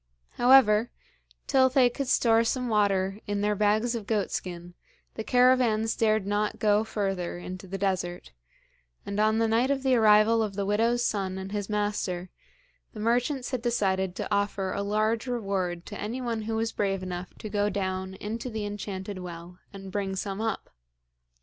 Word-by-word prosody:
However, 240 -3 +5 0.6
till 260 -1 +4
they 260 -1 +4
could 255 +3 -3
store 230 -2 +4
some 250 +1 -1
water 200 -2 +1
in 205 0 -1
their 210 0 +2
bags 215 +3 +2
of 225 -4 -5
goat 210 -4 0
skin, 175 -1 -5 0.4
the 220 - -5
caravans 245 -3 +3
dared 215 -2 +2
not 205 +1 -1
go 210 0 +3
further 195 -5 -3
into 185 +2 -8
the 195 +2 -4
desert, 180 - -2 0.7
and 200 +1 -3
on 215 +1 +3
the 225 0 +2
night 230 +4 +2
of 275 -1 0
the 265 -1 +3
arrival 220 0 +5
of 210 -3 -2
the 200 0 -1
widow's 230 +4 +1
son 190 -2 -1
and 190 0 -6
his 205 -1 -3
master, 205 -4 -2 0.6
the 215 - -9
merchants 245 +4 0
had 255 -3 -2
decided 190 -6 0
to 210 - -3
offer 200 -2 0
a 200 - -2
large 215 +4 0
reward 195 -7 -2
to 205 - -7
anyone 230 +1 -3
who 220 +1 -3
was 225 0 -1
brave 195 -2 -1
enough 180 -1 -6
to - - -8
go 205 0 0
down 190 -1 -3
into 225 +5 -5
the 220 -2 -4
enchanted 200 -1 -5
well 175 0 -9
and 195 -1 -9
bring 195 -1 -2
some 195 +1 -4
up. 225 -2 -3
210 Hz, 175 wpm, -27 LUFS, 195-225 Hz, 0.7 s, However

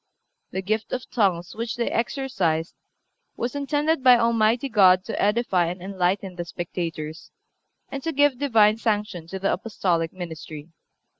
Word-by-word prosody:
The 190 - -4
gift 215 +3 -2
of 255 - -3
tongues 180 -6 +1
which 230 0 -3
they 235 - -1
exercised 190 - -1 0.6
was 240 +1 -2
intended 290 +1 0
by 250 -1 +8
Almighty 230 +2 +2
God 190 -6 +5
to - - -3
edify 205 -5 +2
and 180 +2 -4
enlighten 185 0 -2
the 175 - -4
spectators, 165 -2 -5 0.6
and 275 - -4
to 325 - -2
give 285 -3 +3
Divine 220 -6 +4
sanction 210 -7 -2
to 190 - -5
the 195 +1 0
Apostolic 175 -7 -1
ministry. 160 -3 -8
205 Hz, 145 wpm, -24 LUFS, 175-240 Hz, 0.6 s, by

